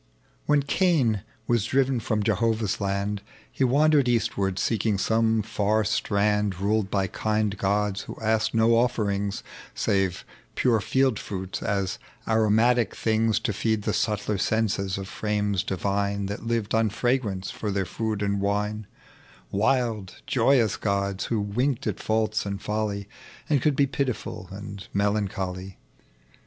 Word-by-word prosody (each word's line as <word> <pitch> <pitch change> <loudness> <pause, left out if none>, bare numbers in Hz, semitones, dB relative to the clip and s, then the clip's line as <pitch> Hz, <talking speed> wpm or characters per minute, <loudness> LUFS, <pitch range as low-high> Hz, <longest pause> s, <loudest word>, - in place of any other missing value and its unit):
When 150 -1 +4
Caiu 140 - +2 0.2
was 115 -3 +1
driven 130 0 +2
from 110 -2 -1
Jehovali's 110 0 0
land 100 +1 -1 0.3
He - - -1
wandered 140 +1 +4
eastward, 105 -5 0
seeking 110 -1 +1
some 110 +1 +2
far 110 +1 +1
strand 105 -2 +1
Ruled 105 0 +1
by 95 -2 +1
Irind 105 0 -1
gods 100 0 0
who - - -9
asked 110 0 +1
no 110 0 +4
bfferiugs 105 -4 +1 0.3
Save 95 -2 0 0.3
pure 120 -3 +3
fleld 130 +1 +1
fruits, 95 -1 -5
as 100 -3 -1 0.3
aromatic 110 +2 +3
things, 110 0 +1
To 105 - -1
feed 110 +1 0
the - - 0
subtler 105 -1 0
sense 110 -1 +1
of 95 0 -3
frames 105 -2 -1
divine 100 +2 -1
That 100 +3 -5
lived 115 -3 -1
on 110 -1 +3
fragrance 110 -4 -1
for 105 - -4
their 100 -1 0
food 110 +3 -2
and 100 -1 0
wine: 105 +1 -1 0.6
Wild 110 -2 0
joyous 120 -3 +3
gods, 100 -1 -1
who 115 - 0
winfeed 125 +6 -1
at - - -2
faults 110 0 0
and 100 -1 -4
folly. 105 -2 -2 0.4
And 145 -4 +2
could 150 +1 +2
be 140 - +4
pitiful 130 -8 -3
and 100 0 -8
melancholy. 95 -2 -1
105 Hz, 140 wpm, -26 LUFS, 100-115 Hz, 0.6 s, When